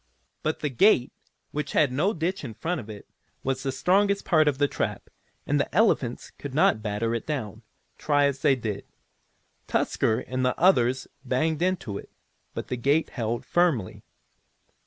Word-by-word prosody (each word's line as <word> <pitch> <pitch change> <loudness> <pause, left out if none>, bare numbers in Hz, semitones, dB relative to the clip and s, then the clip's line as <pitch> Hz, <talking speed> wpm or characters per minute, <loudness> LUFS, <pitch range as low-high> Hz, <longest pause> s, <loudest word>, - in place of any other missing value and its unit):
But 155 - -2
the 150 - 0
gate, 130 - +4 0.4
which 150 -1 -3
had 145 -4 +3
no 155 +11 +1
ditch 180 0 -2
in 115 -5 -6
front 170 +4 -2
of 110 - -13
it, 105 -2 -9 0.4
was 135 0 -1
the 135 - -1
strongest 200 +6 +2
part 155 -5 +4
of 145 -3 +2
the 145 +1 +3
trap, - - -4 0.3
and - - +1
the - - -1
elephants - - +2
could - - -6
not 110 - +4
batter 110 +2 -1
it 115 - -3
down, 110 -8 -4 0.4
try 145 -1 +3
as 140 -1 0
they 135 - +4
did. 110 -5 -4 0.8
Tusker 110 +2 +1
and 130 0 -3
the 125 0 +1
others 130 -8 +3 0.2
banged 155 +5 0
into 175 - -1
it, - - -12 0.5
but - - -5
the 125 - -2
gate 140 +6 +1
held 115 -1 -3
firmly. 165 - +1
135 Hz, 170 wpm, -26 LUFS, 120-160 Hz, 0.8 s, gate